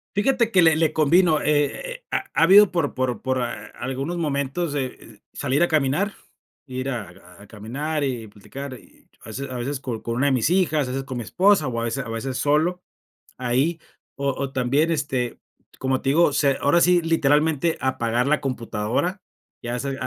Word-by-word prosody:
Fíjate 235 +2 +2
que 185 - +5
le 160 -2 +5
le 160 -1 +1
convino, 160 0 +4
e 145 0 +3
e - - -6
eh, - - -13
ha - - 0
ha - - +3
habido 195 +4 +7
por 165 -5 -1
por 125 -4 -1
por 130 -1 -1
a 120 -1 -5
algunos 135 +6 -3
momentos, 145 +1 -2
e 135 -2 0
eh, 110 -4 -16
salir 140 +2 0
a - - +3
caminar, 155 +7 +1 0.5
ir 130 -1 -4
a 90 -7 -8
a 100 - -14
caminar 140 +9 -4
y 125 -5 -3
platicar 130 +7 -9
y, - - -23 0.2
a - - -12
veces 130 +6 -6
a 130 - -5
veces, 135 +3 -3
con 120 -4 -5
con 115 - -3
una 135 +4 +2
de - - +3
mis 125 0 +2
hijas, 165 -6 +2
a - - -4
veces 135 +1 -3
con 130 -2 -5
mi 120 - -3
esposa 190 - +3
o 115 -2 -2
a - - -2
veces 130 +4 -2
a 115 - -7
veces 125 +3 -3
solo, 160 +5 +1 0.6
ahí, 130 +7 0 0.4
o 140 0 -1
o 135 0 -3
también, 135 +6 +1
este, 135 -6 -2 0.4
como 130 0 0
te 135 - -1
digo, 155 0 +4
se 140 -1 +2
ahora 170 +5 +3
sí, 180 0 +4
literalmente 160 0 +2
apagar 120 -1 0
la 150 +1 +2
computadora. 125 - -2 0.4
Ya 120 +1 -3
se 135 +1 -3
a - - -4
140 Hz, 205 wpm, -23 LUFS, 125-160 Hz, 0.6 s, habido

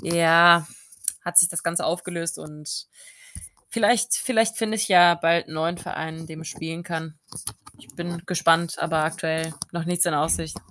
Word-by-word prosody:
ja, 170 -1 +5 0.6
hat 175 0 +5
sich 175 -1 +7
das 170 - -3
Ganze 170 +1 -1
aufgelöst. 170 -1 -3
Und 150 0 -8 0.8
vielleicht 240 +1 +2
vielleicht 225 -2 +1
finde 220 -1 -2
ich 220 +1 0
ja 175 -2 +7
bald 170 -1 +1
'n - - -12
neuen 165 +2 -2
Verein, 160 0 -6
in 165 - -10
dem 160 0 -10
ich 160 - -8
spielen 165 +1 -7
kann. 160 -3 -7 0.6
Ich - - -19
bin 170 -1 -6
gespannt, 170 -2 +1
aber 160 -1 -1
aktuell 160 0 -3 0.2
noch 170 -1 -4
nichts 175 +1 +1
in 170 - 0
Aussicht. 155 +1 -1
170 Hz, 170 wpm, -23 LUFS, 160-175 Hz, 0.8 s, sich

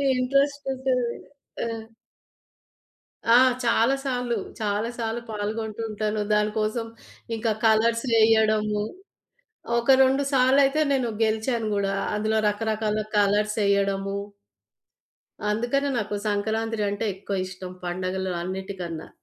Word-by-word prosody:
Interest 275 +3 +1
ఉంటది. 255 -2 -1 0.5
ఆ! - - -2 1.7
ఆ! - - +9 0.3
చాలా 230 +3 +3
సార్లు. 245 -3 -1 0.2
చాలా 210 +2 0
సార్లు 230 +1 -2
పాల్గొంటూ 215 +1 -4
ఉంటాను. 215 0 -2
దానికోసం 215 +2 0 0.5
ఇంకా 225 0 0
కలర్స్ 225 +2 +3
వేయడము 215 -1 +3 1.0
ఒక 235 +3 +3
2 270 +2 +2
సార్లయితే 270 +3 +4
నేను 260 -3 +1 0.2
గెలిచాను 220 +1 0
గూడా 195 0 0 0.2
అందులో 220 +1 0
రకరకాల 215 0 -1 0.2
కలర్సెయ్యడము 200 -1 +1 1.3
అందుకనే 240 +6 0
నాకు 210 -1 -2
సంక్రాంత్రీ 220 +1 -1
అంటే 205 +2 -2
ఎక్కువ 195 +1 -4
ఇష్టం 185 0 -8
పండగలు 185 +1 -2
అన్నిటికన్నా. 185 -3 -5
220 Hz, 95 wpm, -25 LUFS, 205-235 Hz, 1.7 s, ఆ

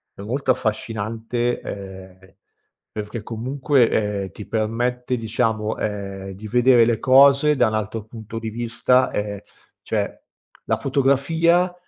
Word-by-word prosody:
è - - -10
molto 130 +5 0
affascinante, 115 +1 -2
ehm, 95 -1 -10 0.6
perché 105 +1 -6
comunque, 130 +2 +1
ehm, 105 -2 -1
ti 105 - -9
permette, 120 +3 -1
diciamo, 110 -1 -1
ehm, 100 -2 -4
di 100 +3 -9
vedere 120 0 +5
le 115 -1 +1
cose 140 +3 +5
da 125 -4 +3
un 110 - -2
altro 110 +1 -3
punto 110 0 -9
di 115 -1 -4
vista, 120 +3 +1
ehm, 105 -1 -3 0.4
cioè - - -3 0.4
la - - 0
fotografia 160 +7 +2
115 Hz, 125 wpm, -22 LUFS, 105-130 Hz, 0.6 s, vedere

